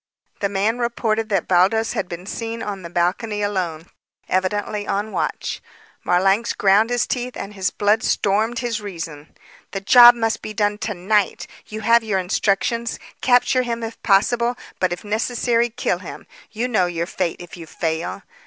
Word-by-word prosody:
The 200 - 0
man 205 +4 0
reported 225 -2 -1
that 195 -4 0
Baldos 195 +5 +3
had - - -3
been 175 +1 -7
seen 230 +2 -5
on 200 -2 -5
the 170 - -8
balcony 195 +5 -1
alone, 180 -6 -2 0.4
evidently 205 +2 -1
on 205 +2 -2
watch. - - -3 0.4
Marlanx 195 +6 +2
ground 205 +3 +3
his 245 -1 +1
teeth 250 -1 -3
and 205 - -6
his 190 -2 -1
blood 210 +2 +1
stormed 215 +4 +1
his 235 -2 -2
reason. 165 -6 -8 0.4
"The 195 - -2
job 240 +4 +9
must 225 -1 -1
be 215 - -7
done 205 0 0
to 210 -2 -3
night. 200 +3 0 0.2
You 215 0 -6
have 230 +2 +4
your 210 -3 0
instructions. 200 +5 0 0.2
Capture 250 0 +3
him 235 -2 -3
if 225 0 -7
possible; 235 +4 +2 0.2
but 185 -1 +1
if 175 - -4
necessary, 230 +2 0
kill 230 - -1
him. - - -9 0.2
You 230 +3 -2
know 215 -7 +2
your 170 -1 -2
fate, 175 -1 -3
if 175 -1 -10
you 165 -2 -10
fail." 160 0 -3
210 Hz, 170 wpm, -21 LUFS, 185-230 Hz, 0.4 s, job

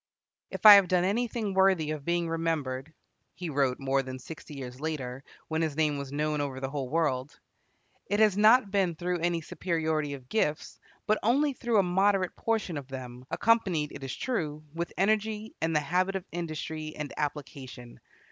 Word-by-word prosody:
"If - - -7
I 210 - +14
have 200 -2 +7
done 180 0 +2
anything 220 +1 -1
worthy 190 -5 +3
of 150 -2 -5
being 170 +1 0
remembered," 160 -4 -2 0.4
he 170 0 -5
wrote, 135 -3 +1
more 135 0 +1
than 130 -1 -7
sixty 150 +2 -10
years 125 -2 -7
later, 135 -4 -4 0.2
when 160 0 -1
his 155 -3 -1
name 150 -2 +1
was 140 -1 -6
known 150 +1 -1
over 135 -2 -3
the 135 0 -4
whole 135 -3 -3
world, 140 -4 -1 0.7
"it 205 +1 0
has 215 -3 +5
not 215 +1 +5
been 190 -4 +1
through 175 +2 -2
any 170 0 0
superiority 160 -3 -2
of 130 -2 -14
gifts, 155 -7 -1 0.3
but 215 0 +2
only 275 +6 +2
through 240 -3 0
a 200 - +5
moderate 190 +1 +2
portion 220 -8 -1
of 135 - -11
them, 125 -2 -8
accompanied, 190 -10 +2
it 140 - -9
is 135 - -4
true, 155 - -3
with 170 +1 -3
energy 215 +2 0
and 160 0 0
the - - +5
habit 185 +5 0
of 190 -1 -3
industry 155 -2 -5
and 150 -1 -5
application. 135 -4 -6
160 Hz, 180 wpm, -29 LUFS, 145-195 Hz, 0.7 s, I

